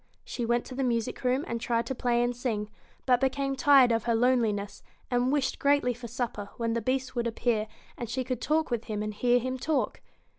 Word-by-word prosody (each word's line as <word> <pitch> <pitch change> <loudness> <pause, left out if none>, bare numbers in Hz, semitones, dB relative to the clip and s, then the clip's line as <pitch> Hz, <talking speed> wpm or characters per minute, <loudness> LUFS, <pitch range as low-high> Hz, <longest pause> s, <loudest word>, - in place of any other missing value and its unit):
She 240 -2 -3
went 240 0 +1
to - - -8
the 270 +1 -2
music 235 -1 -1
room 255 +3 +1
and 235 0 -3
tried 235 0 0
to 265 - -3
play 240 -1 +1
and 245 0 -1
sing, 215 -4 -3 0.3
but 250 -1 +3
became 275 +1 0
tired 270 -2 +6
of 225 -1 0
her 235 -1 +2
loneliness, 225 -4 +1 0.3
and 245 +1 +2
wished 280 -2 0
greatly 280 -3 +3
for 240 0 -9
supper, 225 -4 -4
when 230 -1 -1
the 235 - -1
Beast 260 +3 -1
would 240 -1 0
appear 225 -1 0 0.3
and 240 -3 -4
she 260 +2 -1
could 255 -1 -3
talk 310 -2 +1
with 235 -1 -1
him, 210 -2 -3
and 215 0 -3
hear 245 +3 +3
him 255 +1 -2
talk. 305 +2 -1
245 Hz, 220 wpm, -28 LUFS, 230-260 Hz, 0.3 s, tired